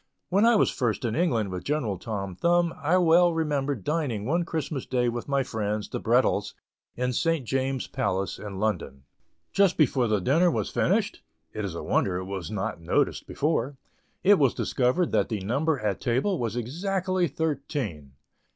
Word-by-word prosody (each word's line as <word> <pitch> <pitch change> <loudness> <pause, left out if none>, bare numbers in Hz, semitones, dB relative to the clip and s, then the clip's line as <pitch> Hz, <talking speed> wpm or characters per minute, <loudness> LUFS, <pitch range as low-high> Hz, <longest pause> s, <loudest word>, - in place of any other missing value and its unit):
When 200 +5 +4
I 235 - +5
was - - +3
first 120 -3 -1
in 115 - -1
England 120 - +1
with 90 -1 -5
General 125 - -1
Tom 100 -3 -4
Thumb, 170 - +2
I 160 +5 +2
well 175 0 +5
remember 145 -3 0
dining 125 - -2
one 170 +7 +1
Christmas 155 -4 -3
day 125 -2 +1
with 120 0 -5
my 140 -1 +1
friends, 105 -3 -3
the - - -4
Brettells, - - +1 0.4
in 125 +1 -1
St. 165 -2 0
James's 135 +1 -1
Palace, 95 -7 -2
in 100 -2 -7
London. 90 -10 -2 0.5
Just 200 -3 +3
before 130 -5 +3
the 105 -2 +1
dinner 155 - +3
was - - -2
finished 200 +3 0 0.3
(it 110 - -4
is 95 -4 -4
a - - -5
wonder 90 -2 +1
it 95 - -4
was 95 -2 -5
not 105 -3 -3
noticed 85 - 0
before) 140 -3 -1 0.5
it 200 0 +6
was 135 -4 +3
discovered 130 +8 +1
that 105 -3 +1
the 110 -3 -2
number 140 +10 0
at 105 -4 -2
table 135 +11 0
was 115 -2 -2
exactly 180 - -1
thirteen. 135 - -3
130 Hz, 175 wpm, -26 LUFS, 105-165 Hz, 0.5 s, it